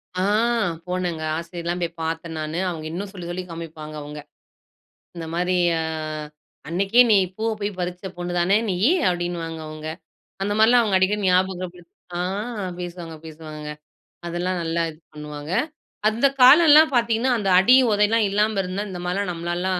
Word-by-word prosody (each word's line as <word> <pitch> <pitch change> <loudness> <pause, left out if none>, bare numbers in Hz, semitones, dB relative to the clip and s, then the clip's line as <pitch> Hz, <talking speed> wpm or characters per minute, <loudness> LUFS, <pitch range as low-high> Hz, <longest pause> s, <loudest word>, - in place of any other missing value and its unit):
ஆ 185 - -1 0.7
போனங்க 180 -3 -2 0.2
ஆசிரியரெல்லாம் 170 +1 -4
போய்ப் 170 -1 -4
பாத்து 165 +1 -3
நானு. 155 +2 -3
அவங்க 160 -3 -6
இன்னும் 195 +4 -5
சொல்லிச், 180 -4 -8
சொல்லி 185 +1 -4
காமிப்பாங்க. 155 -2 -8
அவங்க, 150 +1 -8 1.0
இந்த 165 -1 -5
மாரி 180 +1 +1 0.2
ஆ - - -1 0.9
அன்னைக்கே 195 +8 +3
நீ 210 - +7 0.2
பூவ 225 +1 -1
போய் 200 -2 -3
பறிச்ச 180 +1 -4
பொண்ணுதானே 175 +2 +1
நீயி 185 - +2 0.2
அப்டின்னு 175 -1 -2
வாங்க. 165 -1 -6
அவங்க 155 0 -8 0.6
அந்த 205 - 0
மாரிலாம் 225 -2 +5
அடிக்கடி 195 +3 +2
ஞாபகம் 185 -1 +1
படுத்தி 175 -1 -18 0.3
ஆ - - -1 0.6
பேசுவாங்க 175 -2 -7
பேசுவாங்கங்க. 155 -1 -8 0.5
அதெல்லாம் 175 +2 -2
நல்லா 165 0 -1
இது 155 - -15
பண்ணுவாங்க. 150 +1 -7 0.6
அந்தக் 270 +6 +1
காலெல்லாம் 305 +3 +8
பாத்தீங்கன்னா, 235 +2 +2
அந்த 200 -3 -1
அடி, 245 +7 +6 0.2
உதைல்லாம் 210 +2 +3
இல்லாம 210 0 +1
இருந்தா 185 +3 -3
இந்த 180 -2 -6
மாரிலாம் 180 +1 -1
நம்மளால 175 +2 -3
180 Hz, 145 wpm, -23 LUFS, 165-205 Hz, 1.0 s, காலெல்லாம்